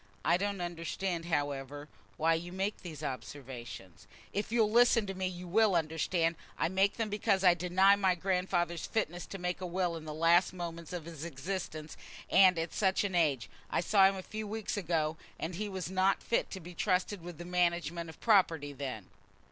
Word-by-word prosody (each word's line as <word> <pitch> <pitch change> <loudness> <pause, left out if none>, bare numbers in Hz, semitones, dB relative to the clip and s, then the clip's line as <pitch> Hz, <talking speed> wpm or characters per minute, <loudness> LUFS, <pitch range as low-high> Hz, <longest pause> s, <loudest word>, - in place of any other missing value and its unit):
I - - +5
don't 200 +1 -1
understand, 175 0 -3
however, 145 -2 -2 0.3
why 165 +1 +3
you 170 +2 -3
make 195 +3 -2
these 155 -4 -9
observations." 120 - -7 0.3
"If 205 +2 -2
you'll 225 -3 +3
listen 235 -1 +5
to 195 - -4
me 190 0 -2
you 180 0 -7
will 210 +1 +3
understand. 165 +1 0 0.2
I - - +1
make 195 +2 +2
them 225 -3 -2
because 205 -2 +1
I 180 -2 +7
deny 180 +3 +4
my 190 -2 +2
grandfather's 180 -2 -1
fitness 175 -6 -2
to 195 - -6
make 180 0 -3
a 180 - -3
will 175 -1 -1
in 160 -1 -8
the 155 - -5
last 170 +4 +4
moments 170 -2 -6
of 175 -3 -5
his 165 -3 -8
existence, 160 0 -5 0.3
and 185 -2 +7
at 165 0 -2
such 190 -1 +2
an 200 -2 -2
age. 150 -8 +2 0.2
I - - 0
saw 195 +2 +5
him 195 - -3
a 190 - -6
few 215 +2 -5
weeks 220 0 -3
ago, 160 -5 0 0.2
and 165 - -3
he 205 +4 -3
was 185 -2 -4
not 190 +1 +2
fit 230 - 0
to 190 - -6
be 175 0 -10
trusted 185 +2 0
with 175 -1 -8
the 175 - -8
management 170 -1 0
of 160 - -12
property 165 -10 +3
then." 130 -7 -5
175 Hz, 195 wpm, -32 LUFS, 165-195 Hz, 0.3 s, I